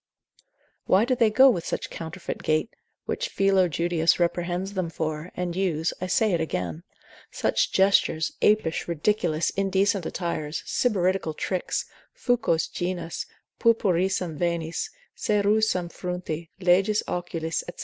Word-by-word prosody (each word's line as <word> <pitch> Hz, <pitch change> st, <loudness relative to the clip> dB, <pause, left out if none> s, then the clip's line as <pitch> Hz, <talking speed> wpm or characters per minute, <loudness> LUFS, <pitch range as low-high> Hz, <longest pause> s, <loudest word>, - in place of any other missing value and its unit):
why 195 Hz, +4 st, +4 dB
do 255 Hz, -, +1 dB
they 235 Hz, -3 st, +3 dB
go 260 Hz, +6 st, +7 dB
with 190 Hz, -11 st, +2 dB
such -, -, -4 dB
counterfeit 165 Hz, +2 st, -6 dB
gait, 155 Hz, +8 st, 0 dB, 0.3 s
which -, -, -2 dB
Philo 195 Hz, -2 st, +3 dB
Judeus 170 Hz, +1 st, +1 dB
reprehends 175 Hz, +2 st, -1 dB
them 185 Hz, -4 st, -2 dB
for, 155 Hz, +1 st, -4 dB
and 180 Hz, -1 st, -2 dB
use 175 Hz, -4 st, 0 dB
(I 185 Hz, -, -2 dB
say 215 Hz, +4 st, +2 dB
it 170 Hz, -, +1 dB
again) 85 Hz, -, -3 dB, 0.5 s
such -, -, 0 dB
gestures, 190 Hz, -5 st, +3 dB
apish, 210 Hz, -6 st, +2 dB
ridiculous, 170 Hz, -1 st, 0 dB
indecent 195 Hz, -1 st, +1 dB
attires, 160 Hz, -4 st, -3 dB
sybaritical 185 Hz, -7 st, 0 dB
tricks, 185 Hz, -2 st, -2 dB, 0.3 s
fucos 235 Hz, -, +1 dB
genis, 175 Hz, -2 st, -4 dB, 0.3 s
purpurissam 185 Hz, -7 st, +1 dB
venis, 170 Hz, -1 st, -1 dB, 0.3 s
cerussam 205 Hz, -4 st, +1 dB
fronti, 175 Hz, -3 st, -5 dB
leges 195 Hz, +4 st, +3 dB
occulis, 165 Hz, -2 st, -3 dB, 0.2 s
&c. -, -, -15 dB
180 Hz, 125 wpm, -26 LUFS, 165-195 Hz, 0.5 s, go